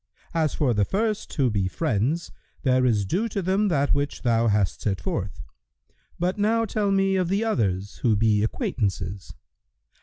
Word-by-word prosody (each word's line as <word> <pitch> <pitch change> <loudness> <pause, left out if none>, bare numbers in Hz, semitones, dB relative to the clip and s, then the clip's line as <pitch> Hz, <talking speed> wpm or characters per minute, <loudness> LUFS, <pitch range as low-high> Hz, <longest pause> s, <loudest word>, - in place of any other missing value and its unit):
[FN#114] 165 - +1
As 155 - 0
for 135 -5 +2
the 105 -2 +2
first 215 - -1
who 130 -6 +2
be 100 -3 0
friends, 145 - -1 0.3
there 130 -2 +3
is 105 -4 +2
due 205 - -1
to 200 - -3
them 195 +3 +1
that 145 -6 +2
which 145 0 -2
thou 115 -1 +2
hast 105 -2 +1
set 95 -4 -1
forth; 85 - -4 0.7
but 180 +4 -1
now 225 +2 +2
tell 210 -1 -1
me 195 0 +2
of 185 -2 +1
the 200 +4 +1
others 100 - -1
who 115 -3 +2
be 105 0 +3
acquaintances." 100 -4 -2
135 Hz, 175 wpm, -25 LUFS, -, 0.7 s, there